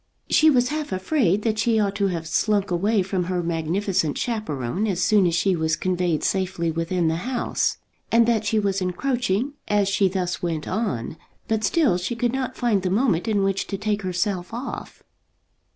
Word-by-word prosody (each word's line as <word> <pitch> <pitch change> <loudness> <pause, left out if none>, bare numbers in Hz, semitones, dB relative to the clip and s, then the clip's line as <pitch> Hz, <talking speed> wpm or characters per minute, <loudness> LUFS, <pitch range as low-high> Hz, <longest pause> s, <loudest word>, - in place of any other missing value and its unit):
She 315 - +6
was 250 -4 +3
half 305 -3 -3
afraid 195 - +1
that 220 -2 0
she 225 -1 +2
ought 200 -2 +1
to 200 -1 +2
have 165 -3 -3
slunk 205 +2 +1
away 200 +3 +2
from 185 -1 -2
her 180 0 -1
magnificent 170 0 -1
chaperon 200 - -2
as 185 -3 0
soon 205 -4 +4
as 170 - +1
she 185 +2 +2
was 160 -1 0
conveyed 180 -2 -1
safely 185 -3 0
within 165 +1 -1
the 160 0 +1
house, 245 +7 -1 0.3
and 230 0 +5
that 225 -2 +2
she 220 +1 0
was 200 -2 0
encroaching 245 +5 -1
as 205 -1 +2
she 195 0 +2
thus 185 -1 -2
went 165 -3 -2
on; 160 - -2 0.3
but 220 -1 0
still 255 - +2
she 190 +6 -3
could 240 +1 0
not 265 -2 -3
find 225 -5 +1
the 185 - -1
moment 205 -2 +1
in 205 -3 +2
which 195 0 0
to 195 - -3
take 210 +1 -1
herself 180 0 -2
off. 250 +3 -7
195 Hz, 185 wpm, -23 LUFS, 175-220 Hz, 0.3 s, She